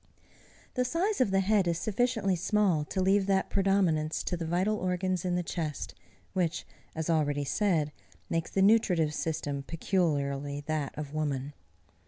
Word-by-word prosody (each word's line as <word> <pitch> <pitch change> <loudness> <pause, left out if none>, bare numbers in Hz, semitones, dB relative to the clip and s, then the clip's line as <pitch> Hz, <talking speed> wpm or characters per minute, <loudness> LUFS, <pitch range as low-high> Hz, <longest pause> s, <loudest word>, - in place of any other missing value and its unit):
The 250 - +1
size 340 - 0
of 255 - +3
the 195 0 +3
head 200 -1 +2
is 170 -1 +1
sufficiently 215 -1 +1
small 185 -3 +2
to 190 - -3
leave 195 +1 +3
that 195 -1 +1
predominance 185 -6 +1
to 180 - -1
the 165 -1 -4
vital 185 +6 +1
organs 185 -1 -1
in 180 -1 +1
the 180 - 0
chest, 160 -3 -4 0.4
which, 175 -2 -1 0.3
as 160 -1 -3
already 145 -3 +1
said, 160 -2 +1 0.4
makes 165 +6 -1
the 195 - +2
nutritive 185 -8 +4
system 145 -3 -2
peculiarly 145 -4 -1
that 150 -3 -2
of 150 -1 -5
woman. 145 -2 -2
175 Hz, 155 wpm, -29 LUFS, 155-195 Hz, 0.4 s, nutritive